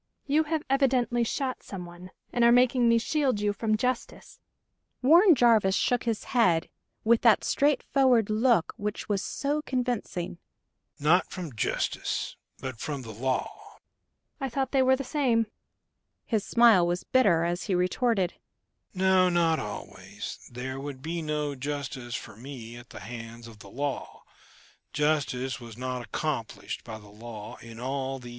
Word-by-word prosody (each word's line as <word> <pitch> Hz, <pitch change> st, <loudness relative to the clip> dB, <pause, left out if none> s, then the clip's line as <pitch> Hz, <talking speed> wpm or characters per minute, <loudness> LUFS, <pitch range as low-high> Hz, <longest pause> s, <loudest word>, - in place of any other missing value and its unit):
"You 300 Hz, +2 st, +2 dB
have 315 Hz, 0 st, -1 dB
evidently 255 Hz, -3 st, +2 dB
shot 255 Hz, +2 st, -2 dB
someone, 180 Hz, -1 st, -9 dB, 0.2 s
and 240 Hz, -, +2 dB
are 235 Hz, -, +7 dB
making 245 Hz, 0 st, +4 dB
me 230 Hz, -, +5 dB
shield 260 Hz, -1 st, +1 dB
you 205 Hz, 0 st, +1 dB
from 215 Hz, +1 st, 0 dB
justice." 250 Hz, +1 st, -3 dB, 0.6 s
Warren 340 Hz, +6 st, +7 dB
Jarvis 225 Hz, -6 st, +4 dB
shook 245 Hz, +3 st, +1 dB
his 230 Hz, -3 st, -1 dB
head, 180 Hz, -10 st, +2 dB, 0.3 s
with 230 Hz, +1 st, +4 dB
that 230 Hz, -4 st, +5 dB
straightforward 265 Hz, -5 st, +2 dB
look 220 Hz, -4 st, +3 dB
which 210 Hz, -1 st, -4 dB
was 200 Hz, -2 st, 0 dB
so 290 Hz, +2 st, -1 dB
convincing. 245 Hz, -, -3 dB, 0.6 s
"Not 160 Hz, +5 st, +3 dB
from 175 Hz, -7 st, -6 dB
justice, 105 Hz, -, -2 dB, 0.2 s
but 130 Hz, -4 st, -6 dB
from 145 Hz, -4 st, -4 dB
the 115 Hz, -, -8 dB
law? 130 Hz, +4 st, -3 dB, 0.6 s
"I 270 Hz, -2 st, -2 dB
thought 265 Hz, +1 st, -2 dB
they 270 Hz, -, +3 dB
were 260 Hz, 0 st, +5 dB
the 275 Hz, -, -4 dB
same." 255 Hz, -5 st, +1 dB, 0.8 s
His 220 Hz, -4 st, 0 dB
smile 225 Hz, -7 st, +5 dB
was 175 Hz, +1 st, -1 dB
bitter, 205 Hz, -11 st, +3 dB
as 175 Hz, +1 st, -1 dB
he 195 Hz, -, 0 dB
retorted: 185 Hz, +1 st, +1 dB, 0.6 s
"No, 185 Hz, 0 st, +4 dB
not 170 Hz, -2 st, +2 dB
always. 105 Hz, -, -7 dB
There 130 Hz, +2 st, -5 dB
would 135 Hz, -1 st, -7 dB
be 165 Hz, +1 st, -3 dB
no 150 Hz, -2 st, -2 dB
justice 135 Hz, -3 st, -4 dB
for 110 Hz, -, -7 dB
me 120 Hz, -1 st, -9 dB
at 120 Hz, 0 st, -12 dB
the -, -, -10 dB
hands 115 Hz, 0 st, -8 dB
of 110 Hz, -2 st, -13 dB
the 100 Hz, -, -12 dB
law: 140 Hz, +5 st, -4 dB, 0.7 s
justice 140 Hz, -4 st, 0 dB
was 115 Hz, -2 st, -11 dB
not 125 Hz, -1 st, -3 dB
accomplished 135 Hz, -4 st, -4 dB
by 110 Hz, -2 st, -7 dB
the 105 Hz, -1 st, -15 dB
law 105 Hz, 0 st, -9 dB
in 115 Hz, -1 st, -11 dB
all 135 Hz, +1 st, -2 dB
these 125 Hz, -, -13 dB
years." -, -, -7 dB
180 Hz, 155 wpm, -28 LUFS, -, 0.8 s, are